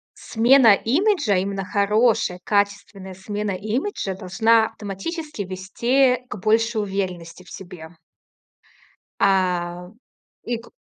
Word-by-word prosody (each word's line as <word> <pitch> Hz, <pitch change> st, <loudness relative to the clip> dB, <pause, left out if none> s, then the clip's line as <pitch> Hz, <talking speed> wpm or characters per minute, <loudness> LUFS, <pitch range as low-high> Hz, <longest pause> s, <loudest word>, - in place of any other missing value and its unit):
смена 235 Hz, -1 st, +4 dB
имиджа, 290 Hz, -, +1 dB
именно 195 Hz, +1 st, -2 dB
хорошая, 210 Hz, -1 st, +1 dB
качественная 200 Hz, -1 st, -2 dB
смена 205 Hz, +2 st, -4 dB
имиджа, 210 Hz, -, -3 dB
должна 220 Hz, +5 st, +2 dB
автоматически 220 Hz, -, -6 dB
вести 240 Hz, +8 st, 0 dB
к 230 Hz, -, -7 dB
большей 220 Hz, +2 st, +1 dB
уверенности 185 Hz, -4 st, -5 dB
в 175 Hz, -, -17 dB
себе. 175 Hz, -4 st, -10 dB, 1.3 s
А, 180 Hz, -2 st, 0 dB, 0.5 s
и 240 Hz, -, -2 dB
к 230 Hz, -, -15 dB
205 Hz, 100 wpm, -22 LUFS, 185-230 Hz, 1.3 s, смена